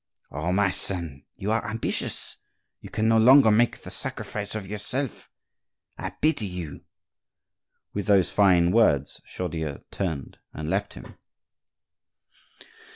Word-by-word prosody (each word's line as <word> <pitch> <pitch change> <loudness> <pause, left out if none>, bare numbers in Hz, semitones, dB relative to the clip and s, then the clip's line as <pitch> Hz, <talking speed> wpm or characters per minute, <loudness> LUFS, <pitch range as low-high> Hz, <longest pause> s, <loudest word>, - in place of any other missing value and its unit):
"Oh! 75 +5 -2
my 100 +1 +2
son; 85 -9 -3
you 100 +3 -3
are 110 0 +1
ambitious, 115 +2 -1 0.4
you - - -11
can 110 - 0
no 115 0 +5
longer 125 0 +7
make 115 +3 +3
the - - -10
sacrifice 105 +1 -4
of 105 -3 -5
yourself!—I 110 +6 -6
pity 155 -9 0
you!" 90 -5 -7 1.1
With 100 -2 -3
those 95 -5 +4
fine 90 -4 +4
words 75 - +2
Chaudieu 80 -5 -4
turned 80 -9 -4
and 75 +1 -4
left - - -1
him. - - -12
100 Hz, 120 wpm, -26 LUFS, 85-110 Hz, 1.1 s, longer